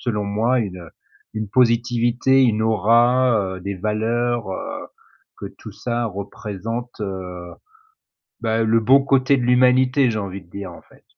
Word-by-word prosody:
selon 105 -4 -2
moi, 110 +5 +1
une, 95 -5 -4
heu, 85 -2 -12 0.4
une 110 -1 -4
positivité, 120 +2 +2
une 110 -4 +2
aura, 110 -1 +2
heu, - - -10
des 100 +2 -4
valeurs, 115 +2 -1
heu, 95 - -6 0.5
que - - -6
tout - - -10
ça 120 -1 -3
représente, 110 +3 -6
heu, 90 -3 -6 0.9
bah, 115 -1 0
le 115 +1 +3
bon 135 +5 +5
côté 135 0 +3
de 125 - -2
l'humanité, 125 +2 +3
j'ai 110 - -3
envie 100 -1 -6
de 85 - -22
dire, 100 0 -7
en - - -13
fait. - - -23
115 Hz, 155 wpm, -21 LUFS, 100-125 Hz, 0.9 s, bon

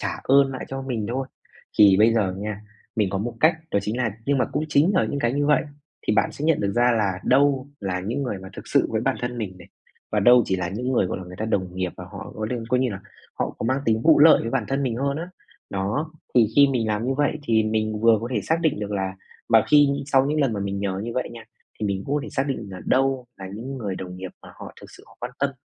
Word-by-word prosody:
trả - - -3
ơn 135 0 +5
lại 130 - -5
cho 135 0 -5
mình 120 -6 -3
thôi. 130 +2 -2 0.5
Thì 100 -2 +7
bây 110 +2 +5
giờ 100 -5 +1
nha, 105 0 -4 0.4
mình 105 -4 +1
có 95 - -1
một 115 +3 -3
cách, 160 +1 +5
đó - - +2
chính 105 +3 -3
là 125 -3 0 0.2
nhưng 140 -1 +2
mà - - +3
cũng 150 - -1
chính 150 +5 +4
là 185 - +3
những 140 - -3
cái 120 -1 +1
như 145 +1 0
vậy 150 -2 +4 0.4
thì - - +2
bạn - - +2
sẽ 145 - -6
nhận 160 -1 +3
được 100 -1 0
ra 120 +2 +3
là 100 -5 0
đâu 140 0 +3
là 95 -2 -2
những 115 +9 -3
người 120 -7 -3
mà 95 0 -10
thực - - -9
sự - - +2
với - - 0
bản - - 0
thân 125 0 -3
mình 100 -5 -4
này, 90 - -14 0.4
và 105 - +2
đâu 120 +4 +7
chỉ 95 - 0
là 90 -1 -2
những 125 +7 -3
người, 110 -7 +2
gọi 90 - -3
là, 95 - -8
người 90 +1 -10
ta 110 - -2
đồng 95 -5 -1
nghiệp 90 -1 -2
và 90 - -8
họ 100 +2 -9
coi 110 - -3
lư 120 -2 -3
coi 125 +1 +2
như 130 -2 +1
là 95 -2 -6 0.4
họ - - -2
có - - -3
mang 130 +3 +1
tính 110 0 +1
vụ 160 -2 +6
lợi 155 +2 +7
với 115 - -3
bản 125 -2 0
thân 135 +1 0
mình 125 -4 -1
hơn 140 +2 -1
á. 170 +3 -5 0.4
Đó, 105 +12 -2 0.2
thì 120 -3 +6
khi 140 - +8
mình 120 -4 0
làm 110 +3 -1
như 135 - 0
vậy 145 +2 0
thì 115 -4 +2
mình 110 0 -1
vừa 115 -1 +5
có 115 - -4
thể 105 - +1
xác 160 +9 0
định 160 -10 0
được 105 -1 -4
là 95 -1 -2 0.3
mà 115 -2 +5
khi 145 -1 +7 0.2
sau 135 -2 +3
những 150 +2 0
lần 135 -5 +2
mà 100 - -3
mình 100 0 -3
nhờ 95 -1 -2
như 120 - -4
vậy 125 - -1
nha, 115 -1 -10 0.4
thì 105 - 0
mình 100 -1 -2
cũng 140 - -1
có - - 0
thể 150 - -7
xác 135 - 0
định 130 -6 -3
là 95 - -8
đâu 135 -1 +1
là 95 -1 -8
những 130 +5 -6
người 100 -5 -3
đồng 90 -1 -7
nghiệp 95 0 -7
mà - - -13
họ - - -10
thực - - -13
sự - - -15
họ - - -20
quan 120 - -4
tâm, 140 0 +1
115 Hz, 290 wpm, -24 LUFS, 100-135 Hz, 0.5 s, khi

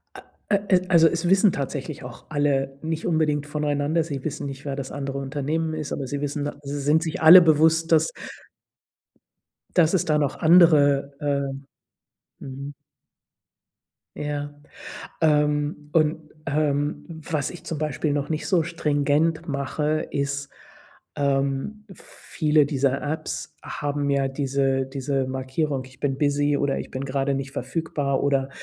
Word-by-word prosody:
A - - -10 0.3
äh, 200 - +4 0.2
äh, 180 - -1
also 165 -2 +6
es 170 +1 -1
wissen 195 0 +5
tatsächlich 140 +1 -4
auch 125 - -11
alle 140 -2 0
nicht 160 0 -3
unbedingt 150 -3 +1
voneinander. 150 +2 0
Sie 140 -5 -6
wissen 145 -2 -4
nicht, 135 0 -7
wer 140 -1 -3
das 135 -1 -5
andere 140 -1 -4
Unternehmen 150 +4 -2
ist, 155 -2 -4
aber 135 - -3
sie 140 +2 -4
wissen, 145 0 -2
da 145 - -3
sie 145 +1 -4
sind 150 +4 +2
sich 160 -2 -3
alle 170 +3 +11
bewusst, 160 +1 +3
dass 160 0 +4 1.6
dass 170 0 +4
es 185 - +2
da 155 -1 +2
noch 145 -3 0
andere, 150 -5 +5
äh 140 -2 -1 0.9
Mhm. 140 +2 -7 1.4
Ja, 145 -1 -4 0.7
ähm, 150 -1 +1
und, 155 -1 +1 0.2
ähm, 145 0 0 0.3
was 150 -3 -1
ich 175 - -11
zum 160 - -4
Beispiel 150 0 -1
noch 145 0 -1
nicht 155 -1 -3
so 180 -4 +3
stringent 160 0 0
mache, 150 +2 -1
ist 140 0 -2 0.7
ähm, 140 +9 -1
viele 150 -3 0
dieser 140 -2 0
Apps 155 +1 -4
haben 145 -1 -2
ja 140 -1 +2
diese 135 -1 0
diese 135 0 -2
Markierung, 130 +1 -2
„Ich 130 0 -17
bin 135 -2 -1
busy“ 145 0 +2
oder 140 -1 0
„Ich - - -8
bin 130 +1 -4
gerade 135 0 -1
nicht 135 0 -4
verfügbar“ 145 -4 -2
oder, 135 -1 +1
145 Hz, 145 wpm, -24 LUFS, 140-155 Hz, 1.6 s, alle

